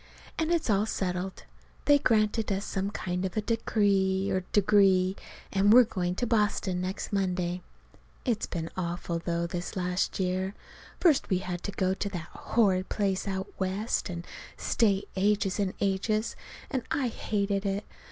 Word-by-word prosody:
And 320 Hz, 0 st, +1 dB
it's 340 Hz, -2 st, +1 dB
all 210 Hz, -1 st, +2 dB
settled. 185 Hz, -2 st, -3 dB, 0.4 s
They 290 Hz, -1 st, +6 dB
granted 220 Hz, -4 st, +2 dB
us 195 Hz, +1 st, -1 dB
some 195 Hz, 0 st, -2 dB
kind 180 Hz, -2 st, -3 dB
of 190 Hz, +2 st, -3 dB
a -, -, +3 dB
decree 200 Hz, -4 st, +1 dB
or 190 Hz, -, +2 dB
degree, 195 Hz, -2 st, +4 dB, 0.4 s
and 200 Hz, +1 st, +4 dB
we're 250 Hz, +3 st, +9 dB
going 180 Hz, -5 st, -2 dB
to 245 Hz, -, -1 dB
Boston 210 Hz, -5 st, +1 dB
next 185 Hz, +3 st, -4 dB
Monday. 180 Hz, -2 st, 0 dB, 0.6 s
It's 235 Hz, -5 st, 0 dB
been 165 Hz, -2 st, -4 dB
awful, 175 Hz, -1 st, -2 dB
though 170 Hz, 0 st, -1 dB
this 175 Hz, +1 st, -4 dB
last 180 Hz, +1 st, -1 dB
year. 185 Hz, +1 st, -1 dB, 0.4 s
First 315 Hz, -6 st, +4 dB
we 185 Hz, -, +3 dB
had 180 Hz, -1 st, -4 dB
to 205 Hz, -, -2 dB
go 190 Hz, -1 st, +1 dB
to 200 Hz, +1 st, -3 dB
that 175 Hz, -4 st, -6 dB
horrid 195 Hz, -5 st, +1 dB
place 195 Hz, -2 st, 0 dB
out 190 Hz, 0 st, -3 dB
West, 195 Hz, +3 st, -1 dB
and 170 Hz, -1 st, -5 dB, 0.3 s
stay 200 Hz, -4 st, +2 dB
ages 200 Hz, 0 st, +1 dB
and 195 Hz, -2 st, 0 dB
ages. 210 Hz, +3 st, 0 dB, 0.4 s
And 265 Hz, -3 st, 0 dB
I 270 Hz, -3 st, +1 dB
hated 200 Hz, -3 st, -1 dB
it. 200 Hz, +1 st, -1 dB
195 Hz, 160 wpm, -29 LUFS, 185-210 Hz, 0.6 s, we're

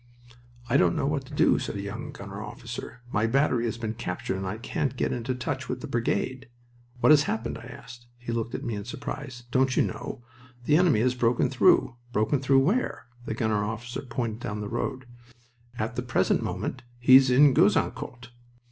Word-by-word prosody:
"I 120 Hz, -, +3 dB
don't 85 Hz, -2 st, +3 dB
know -, -, 0 dB
what 140 Hz, -2 st, -1 dB
to -, -, -12 dB
do," -, -, +4 dB
said -, -, -4 dB
a -, -, -3 dB
young -, -, -6 dB
gunner -, -, -8 dB
officer. 125 Hz, -, -8 dB
"My 110 Hz, +1 st, +1 dB
battery 125 Hz, -1 st, +2 dB
has 115 Hz, -1 st, -2 dB
been 110 Hz, -2 st, -3 dB
captured 95 Hz, -4 st, -4 dB
and 95 Hz, 0 st, -4 dB
I 100 Hz, +4 st, -3 dB
can't 120 Hz, +3 st, -2 dB
get -, -, 0 dB
into 125 Hz, +1 st, -2 dB
touch 125 Hz, -, -4 dB
with -, -, -3 dB
the -, -, -5 dB
brigade." 130 Hz, +2 st, -1 dB, 0.5 s
"What -, -, +6 dB
has 145 Hz, -1 st, +6 dB
happened?" 115 Hz, +1 st, -2 dB
I 115 Hz, -, -11 dB
asked. 120 Hz, 0 st, -11 dB
He 120 Hz, -1 st, -6 dB
looked 115 Hz, 0 st, -2 dB
at -, -, -5 dB
me 115 Hz, -, -3 dB
in 100 Hz, -1 st, -4 dB
surprise. 125 Hz, +1 st, -6 dB
"Don't 130 Hz, 0 st, +2 dB
you -, -, +5 dB
know? 120 Hz, -, -5 dB, 0.4 s
The 150 Hz, -, +4 dB
enemy 160 Hz, -10 st, +4 dB
has 125 Hz, +1 st, +2 dB
broken 120 Hz, -1 st, +1 dB
through." 120 Hz, -, +4 dB
"Broken 115 Hz, +5 st, +1 dB
through 135 Hz, 0 st, +4 dB
where?" 200 Hz, -, 0 dB, 0.2 s
The 110 Hz, -, -3 dB
gunner 110 Hz, -2 st, 0 dB
officer 115 Hz, +3 st, -4 dB
pointed 115 Hz, -3 st, -3 dB
down 105 Hz, -3 st, -4 dB
the 105 Hz, -, -4 dB
road. 130 Hz, +2 st, -3 dB, 0.7 s
"At 110 Hz, +3 st, -2 dB
the 125 Hz, -, -1 dB
present 120 Hz, -1 st, +1 dB
moment -, -, -3 dB, 0.2 s
he's 130 Hz, +2 st, +7 dB
in 135 Hz, +2 st, +6 dB
Gouzeaucourt." 125 Hz, -1 st, +1 dB
120 Hz, 195 wpm, -27 LUFS, 115-130 Hz, 0.7 s, he's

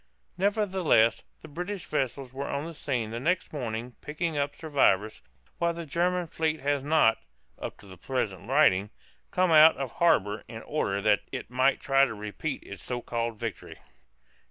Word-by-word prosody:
Nevertheless, 190 Hz, -, +2 dB, 0.2 s
the -, -, -9 dB
British 180 Hz, +4 st, -5 dB
vessels 130 Hz, 0 st, -2 dB
were 135 Hz, +1 st, -4 dB
on 140 Hz, +2 st, -2 dB
the 165 Hz, -, -7 dB
scene 125 Hz, -8 st, -2 dB
the 115 Hz, -, -4 dB
next 175 Hz, +7 st, -1 dB
morning 120 Hz, -3 st, -4 dB
picking 155 Hz, +2 st, -3 dB
up 145 Hz, 0 st, -1 dB
survivors, 110 Hz, -, +1 dB, 0.4 s
while 170 Hz, 0 st, +1 dB
the 170 Hz, 0 st, -6 dB
German 175 Hz, +4 st, 0 dB
fleet 160 Hz, -1 st, -1 dB
has 140 Hz, 0 st, 0 dB
not 150 Hz, -6 st, +3 dB, 0.4 s
(up -, -, -6 dB
to -, -, -16 dB
the 95 Hz, -2 st, -12 dB
present 105 Hz, -2 st, -3 dB
writing) 105 Hz, -9 st, +4 dB, 0.4 s
come 185 Hz, -1 st, +2 dB
out 155 Hz, 0 st, +8 dB
of 135 Hz, -3 st, -4 dB
harbor 110 Hz, -, +2 dB
in 110 Hz, -1 st, -8 dB
order 100 Hz, -10 st, -1 dB
that 105 Hz, -1 st, +4 dB
it -, -, -6 dB
might 130 Hz, +2 st, +3 dB
try 135 Hz, 0 st, +4 dB
to 110 Hz, -, -5 dB
repeat 105 Hz, +8 st, -5 dB
its 100 Hz, -3 st, -10 dB
so 125 Hz, -1 st, -4 dB
called 115 Hz, -1 st, -2 dB
victory. 110 Hz, -5 st, -6 dB
135 Hz, 170 wpm, -28 LUFS, 115-160 Hz, 0.4 s, out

